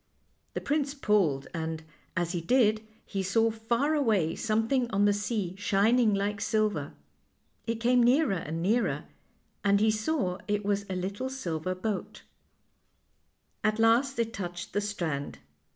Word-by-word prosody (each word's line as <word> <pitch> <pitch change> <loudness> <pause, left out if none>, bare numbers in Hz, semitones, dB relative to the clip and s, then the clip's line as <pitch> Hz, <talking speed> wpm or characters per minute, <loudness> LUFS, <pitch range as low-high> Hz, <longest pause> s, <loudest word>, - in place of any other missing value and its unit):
The - - -2
prince 290 -1 -1
pulled, 195 - +1
and, 160 -1 -3 0.3
as 170 -1 0
he 175 -2 -2
did, 215 +3 +3 0.2
he 195 - -3
saw 225 +4 +2
far 235 +7 0
away 220 - +2
something 230 +3 +1
on 200 0 +2
the 205 - +4
sea 205 -3 -2
shining 210 +2 +3
like 200 +1 -1
silver. 210 -10 0 0.7
It 230 - 0
came 245 +1 +4
nearer 250 0 +4
and 165 -2 -3
nearer, 225 +6 +1 0.6
and 200 0 +4
he 215 +1 +4
saw 215 -4 -1
it 205 -1 -1
was 200 0 0
a 190 - -2
little 200 +8 -3
silver 185 -9 -3
boat, 200 +1 -4 1.4
At 215 0 +2
last 230 +4 +3
it 230 -1 -1
touched 175 -3 -6
the 205 - +1
strand. 170 -9 -3
210 Hz, 145 wpm, -29 LUFS, 185-230 Hz, 1.4 s, the